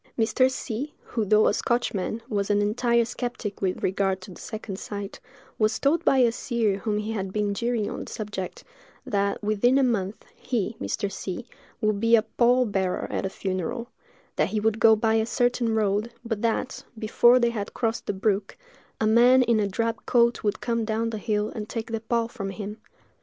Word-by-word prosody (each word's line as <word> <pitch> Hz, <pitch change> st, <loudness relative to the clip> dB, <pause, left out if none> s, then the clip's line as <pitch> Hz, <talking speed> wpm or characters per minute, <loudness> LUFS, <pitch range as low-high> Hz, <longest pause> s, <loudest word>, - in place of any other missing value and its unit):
Mr. 250 Hz, +3 st, +3 dB
C——, 265 Hz, +3 st, -4 dB
who, 230 Hz, -, -2 dB
though 215 Hz, +1 st, +4 dB
a -, -, +3 dB
Scotchman, 230 Hz, -2 st, -1 dB
was 200 Hz, -2 st, -1 dB
an 205 Hz, 0 st, +3 dB
entire 235 Hz, +3 st, +2 dB
skeptic 240 Hz, -3 st, -5 dB
with 185 Hz, -2 st, -1 dB
regard 190 Hz, 0 st, +1 dB
to 185 Hz, -, -10 dB
the 175 Hz, -, -11 dB
second 210 Hz, -3 st, -6 dB
sight, 200 Hz, -1 st, -6 dB, 0.4 s
was 215 Hz, -1 st, +2 dB
told 320 Hz, +5 st, +2 dB
by 270 Hz, -, +4 dB
a 245 Hz, -3 st, +5 dB
seer 230 Hz, -4 st, -1 dB
whom 210 Hz, +1 st, -1 dB
he 210 Hz, +1 st, -3 dB
had 195 Hz, -3 st, -3 dB
been 210 Hz, 0 st, 0 dB
jeering 235 Hz, 0 st, -1 dB
on -, -, -5 dB
the -, -, -10 dB
subject, 205 Hz, -4 st, -5 dB, 0.4 s
that, 200 Hz, 0 st, -1 dB
within 215 Hz, +5 st, +3 dB
a 275 Hz, -, +4 dB
month, 210 Hz, -5 st, -1 dB
he 225 Hz, -3 st, -2 dB
(Mr. 200 Hz, -3 st, -2 dB
C——) 190 Hz, +5 st, -5 dB, 0.4 s
would 215 Hz, -2 st, +1 dB
be 230 Hz, +2 st, +5 dB
a 220 Hz, -, +3 dB
pall 245 Hz, +2 st, +3 dB
bearer 190 Hz, -4 st, -1 dB
at -, -, -1 dB
a -, -, -5 dB
funeral; 200 Hz, +7 st, -3 dB, 0.5 s
that -, -, +2 dB
he 215 Hz, -, -1 dB
would 220 Hz, +1 st, +1 dB
go 220 Hz, -1 st, +7 dB
by 220 Hz, +1 st, +1 dB
a 220 Hz, 0 st, +2 dB
certain 240 Hz, -1 st, +1 dB
road, 210 Hz, +1 st, +1 dB
but 225 Hz, -3 st, -2 dB
that, 230 Hz, +2 st, -1 dB
before 240 Hz, +3 st, +5 dB
they 235 Hz, -1 st, +2 dB
had 210 Hz, -3 st, -5 dB
crossed 225 Hz, -1 st, -1 dB
the -, -, 0 dB
brook, 200 Hz, 0 st, -1 dB, 0.4 s
a 220 Hz, -, +1 dB
man 245 Hz, +4 st, +6 dB
in 235 Hz, -2 st, +2 dB
a 205 Hz, -, +1 dB
drab 225 Hz, +3 st, -2 dB
coat 235 Hz, -1 st, +3 dB
would 210 Hz, 0 st, -1 dB
come 230 Hz, -1 st, 0 dB
down 225 Hz, +1 st, -1 dB
the 220 Hz, -, -4 dB
hill 210 Hz, -1 st, 0 dB
and 215 Hz, -1 st, -6 dB
take 225 Hz, -1 st, -4 dB
the 225 Hz, -, -1 dB
pall 230 Hz, 0 st, 0 dB
from 225 Hz, -5 st, -5 dB
him. 210 Hz, +2 st, -6 dB
220 Hz, 200 wpm, -26 LUFS, 205-235 Hz, 0.5 s, go